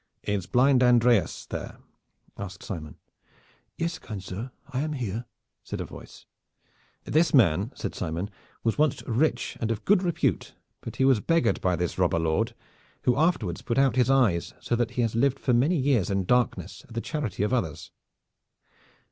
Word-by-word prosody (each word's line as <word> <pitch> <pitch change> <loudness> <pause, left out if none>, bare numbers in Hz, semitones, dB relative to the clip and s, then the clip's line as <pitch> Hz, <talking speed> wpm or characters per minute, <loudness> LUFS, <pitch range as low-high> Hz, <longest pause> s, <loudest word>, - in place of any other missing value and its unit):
"Is 100 -3 -2
blind 130 +1 +4
Andreas 120 -3 +3
there?" - - -6 0.6
asked 95 -3 -7
Simon. 80 -7 -6 0.8
"Yes, 170 0 -2
kind 105 -4 -7
sir, 100 +7 -6 0.2
I 125 - -1
am 155 +2 -1
here," 120 -3 -3 0.4
said - - -5
a - - -3
voice. - - -12 0.8
"This 160 0 +2
man," 100 - +4
said - - -4
Simon, 85 +6 -3 0.3
"was 115 +4 0
once 150 -2 +2
rich 125 +1 0
and 115 - 0
of 115 -2 -3
good 205 -2 +4
repute, 175 -3 -1 0.3
but - - -7
he 130 - +2
was 135 -4 +5
beggared 165 0 +1
by 90 -1 +2
this 90 +1 -3
robber 90 -2 +2
lord, 80 -1 0 0.5
who 125 - +3
afterwards 135 - +1
put 120 - -2
out 135 -3 +4
his 125 -1 +3
eyes 120 -11 +2
so 120 - -1
that 120 -1 0
he 120 - +3
has 115 - 0
lived 135 +3 +2
for 125 - +1
many 140 +9 +3
years 130 - +2
in 100 -1 0
darkness 125 +4 0
at 115 - -13
the 115 - -1
charity 125 - -3
of 105 - 0
others." 95 - -2
120 Hz, 175 wpm, -27 LUFS, 100-135 Hz, 0.8 s, was